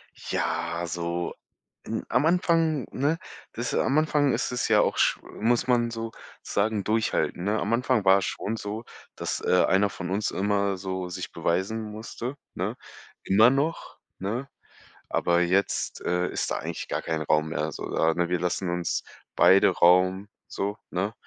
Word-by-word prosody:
Ja, 85 +1 -2
so 85 +1 -3 0.5
n - - -3
am 125 +5 +2
Anfang, 165 -4 +2
ne, 145 +5 0 0.4
das 120 +2 -3
am 135 - +2
Anfang 150 -3 +3
ist - - -1
es 125 -1 -1
ja - - +5
auch - - 0
sch - - +3
muss 120 +2 0
man 120 -2 +3
sozusagen 110 -2 -3
durchhalten, 110 -4 0
ne? 105 +3 +1
Am 105 +3 -1
Anfang 115 -4 +1
war 95 +1 +7
es - - -2
schon 110 - -3
so, 110 +1 -5 0.3
dass, - - -3
äh, 90 - +4
einer 100 +2 +3
von 90 -2 -6
uns 100 +2 0
immer 100 +1 0
so 95 -1 -4
sich 90 +2 -6
beweisen 95 +7 -1
musste, 110 +4 -6 0.2
ne? - - -3 0.5
Immer 110 +5 +6
noch, 140 +5 -1 0.2
ne, 115 +8 -3 0.6
aber 85 0 +2
jetzt, 95 +3 0
äh, 90 0 0
ist - - -2
da - - -1
eigentlich - - -5
gar - - -3
kein 80 -1 -2
Raum 75 +1 +1
mehr 80 0 -2
so - - -6
da, 80 0 +2
ne? 85 -1 0
Wir 90 -1 +1
lassen 90 +1 -1
uns 85 0 -1 0.3
beide 95 +1 +6
Raum 90 +2 +4 0.2
so, 100 +2 -3
ne? 100 +4 -2
100 Hz, 165 wpm, -26 LUFS, 90-115 Hz, 0.6 s, war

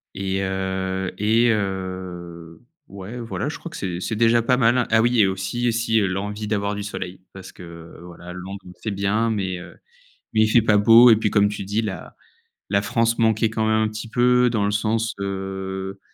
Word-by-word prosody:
et 95 0 -2
heu 95 0 -2
et 115 +3 +3
heu, 95 -4 -5 0.3
ouais, 100 +5 -8
voilà, 120 +4 -4
je 155 - -5
crois 170 - -8
que - - -9
c'est 90 -3 -4
c'est 110 +4 -3
déjà 115 +1 +3
pas 125 +2 +2
mal, 120 -1 +3
hein. 125 - +1
Ah 110 0 +4
oui 120 0 +2
et 100 - +5
aussi 95 +6 -2
et - - +3
si, 115 0 +1
l'envie 105 +2 -3
d'avoir 100 -1 -1
du 105 - -4
soleil. 95 -3 -6
Parce 95 -1 -11
que 85 -1 -12
voilà, 90 0 -10
Londres 95 +2 -8 0.2
c'est 110 - -3
bien, 100 +3 0
mais, 95 -4 -2
heu, - - -12 0.6
mais 110 - +3
il - - +4
fait 115 +1 +4
pas 105 -1 +3
beau 115 +4 +8
et 110 - +7
puis 105 -1 0
comme 100 -1 +3
tu 105 -1 -5
dis, 105 +3 -1
la 95 -6 -6 0.5
la 100 0 +1
France 115 +2 0
manquait 110 -1 +2
quand 110 0 -2
même 110 0 +2
un 110 - +1
petit 110 +2 -7
peu. 125 +1 +3
Dans 110 -3 0
le 105 - -1
sens, 110 +2 0
heu, 95 0 -5
105 Hz, 210 wpm, -22 LUFS, 95-115 Hz, 0.6 s, beau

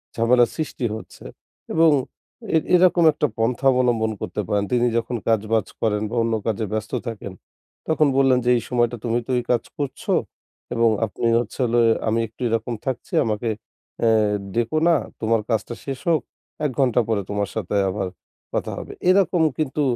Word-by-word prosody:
ঝামেলা 120 +1 +4
সৃষ্টি 150 -5 -3
হচ্ছে। 110 - -11 0.5
এবং 160 0 +5 0.6
এ - - +7 0.2
এরকম 175 -1 +5
একটা - - 0
পন্থা 120 +4 0
অবলম্বন 120 -3 +1
করতে - - -3
পারেন। 100 -1 +1
তিনি 120 0 +3
যখন 115 +1 -2
কাজবাজ 110 0 +1
করেন 105 -2 +1
বা 120 - -5
অন্য 115 - 0
কাজে 110 0 0
ব্যস্ত 110 0 -3 0.2
থাকেন, 105 -4 -6 0.5
তখন 155 -1 +3
বললেন 135 -2 +4
যে 125 - +3
এই 115 - -2
সময়টা 120 -1 +1
তুমি 115 0 +1
তো - - -2
এই - - -4
কাজ 120 -2 +2
করছ। 140 -3 -4 0.7
এবং 115 0 +4 0.2
আপনি 110 +2 -2
হচ্ছে 120 +1 -6
হলে 120 0 +2 0.3
আমি 110 +1 +2
একটু 110 +4 -21
এরকম 115 +1 -1
থাকছি। 130 -2 -4
আমাকে 110 +1 -1 0.5
এ্যা 115 - +4 0.5
ডেকো 120 +6 0
না। 170 - +5 0.3
তোমার 115 0 +2
কাজটা 115 +1 -1
শেষ 135 -2 -4
হোক। 160 -4 +3 0.4
১ 145 - +1
ঘন্টা 125 -2 +3
পরে 110 -3 +1
তোমার 100 -1 -1
সাথে 105 -3 -3
আবার 95 0 -2 0.5
কথা - - -2
হবে। - - -8 0.2
এরকম 185 -2 +3 0.2
কিন্তু 150 -1 -1
120 Hz, 170 wpm, -22 LUFS, 110-130 Hz, 0.7 s, এ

